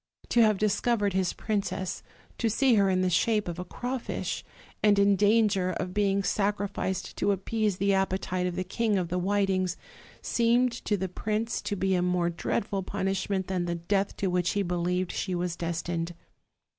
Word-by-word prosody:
To 240 - +4
have 215 -2 +4
discovered 210 0 +1
his 190 -2 +1
princess, 200 -3 -2 0.4
to 230 - +2
see 260 +4 +3
her 200 -3 +4
in 185 -1 +2
the 185 - +2
shape 210 +2 +2
of 175 0 -4
a - - -2
crawfish, 245 +7 -4 0.4
and 205 -1 +4
in 200 0 +5
danger 205 -2 +3
of 180 +1 -4
being 200 -1 +2
sacrificed 200 -2 -1
to 205 - +2
appease 205 +1 0
the 200 +1 +2
appetite 190 -1 0
of 180 - -3
the 185 - -1
King 210 +2 0
of 175 -3 -1
the 180 +1 -1
Whitings, 190 -1 +1 0.5
seemed 240 +1 +3
to 205 - +1
the 190 0 -2
prince 215 +5 -2
to 205 - -2
be 190 0 +1
a 180 - +2
mor.e 180 -1 +1
dreadful 195 +3 -1
punishment 195 0 -1
than 180 -2 -1
the 170 0 -1
death 195 +4 -1
to - - -2
which 180 -1 +1
he 205 - +1
believed 180 0 -1
she 185 -2 -2
was 175 -1 -2
destined. 170 0 -3
195 Hz, 180 wpm, -28 LUFS, 180-205 Hz, 0.5 s, in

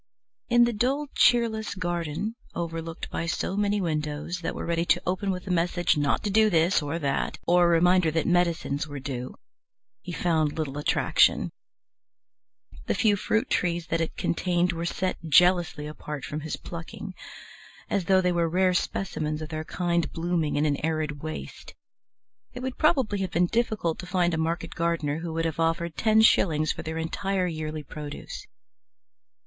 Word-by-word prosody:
In 240 0 +6
the 240 0 +2
dull, 270 +7 0
cheerless 225 -3 +3
garden, 175 +2 -2 0.2
overlooked 165 -1 -5
by 170 - -3
so 175 +3 -2
many 205 0 +1
windows 155 0 -2
that 165 - -4
were - - -4
ready 170 0 0
to - - +2
open 185 +2 -1
with 180 -1 -3
a 190 - -3
message 175 0 +2
not 145 -2 +1
to 205 - -1
do 215 +1 +5
this 170 0 +3
or 145 +2 -3
that, 140 -4 -1
or 175 0 +5
a - - +5
reminder 175 0 +4
that 160 0 0
medicines 170 -4 +1
were 145 -1 -6
due, 130 -2 -5 0.7
he 180 - -7
found 160 -4 0
little 145 -2 -3
attraction. 150 - +3 1.4
The - - +1
few 210 -2 +3
fruit 215 +3 0
trees 175 -1 0
that 165 0 +1
it 165 - -3
contained 175 0 +1
were 170 +1 -3
set 185 +1 -1
jealously 175 -2 +4
apart 150 -2 -6
from 150 - -4
his 155 +1 -4
plucking, 175 +3 -8 0.7
as 195 -4 -1
though 190 +1 +4
they 180 -1 +2
were 170 -1 +1
rare 185 +2 +2
specimens 155 -4 -2
of 155 0 -6
their 155 -1 -4
kind 170 -3 -1
blooming 165 -2 -1
in 145 +1 +2
an 145 -1 0
arid 155 -2 -1
waste; 155 0 -7 0.8
it 250 - -6
would 260 0 -4
probably 260 -10 +2
have 190 -1 -1
been 175 +1 +3
difficult 215 -5 0
to 180 - -7
find 175 -1 +1
a - - 0
market 165 +1 -2
gardener 165 -3 -1
who 165 0 -5
would 165 0 -1
have 165 -1 -2
offered 165 0 0
ten 220 0 +4
shillings 155 -7 +4
for - - -5
their 160 0 -5
entire 185 +3 -1
yearly 155 -2 -4
produce. 150 +1 -8
170 Hz, 175 wpm, -26 LUFS, 155-185 Hz, 1.4 s, In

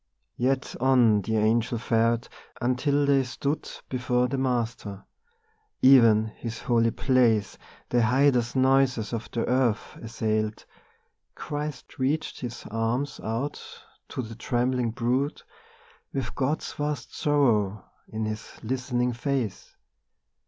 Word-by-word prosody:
Yet 130 +2 0
on 120 -5 +4
the 110 +3 -1
Angel 115 +2 +2
fared, 115 0 +1 0.3
until 140 +4 +1
they 140 -1 +4
stood 140 +4 -3 0.2
Before 125 -1 0
the 135 +2 -2
Master. 115 -6 -2 0.8
(Even 115 -5 +7
His 115 +1 -7
holy 115 -1 +3
place 115 -5 +2 0.3
The 120 - +3
hideous 125 +1 +3
noises 130 -4 +2
of 115 -1 -4
the 115 - -2
earth 125 -4 0
assailed.) 110 -1 -2 0.7
Christ 150 -2 -6
reached 145 +4 -1
His 120 -2 -6
arms 115 +5 -1
out 120 +6 -3 0.5
to 130 - -4
the 115 0 -8
trembling 125 +1 0
brood, 125 +5 -1 0.7
With 135 -2 -3
God's 140 +3 -1
vast 145 -3 -4
sorrow 110 -9 +2 0.2
in 110 0 -3
His 110 0 -5
listening 125 0 -1
face. 125 -4 -3
125 Hz, 115 wpm, -26 LUFS, 115-135 Hz, 0.8 s, Even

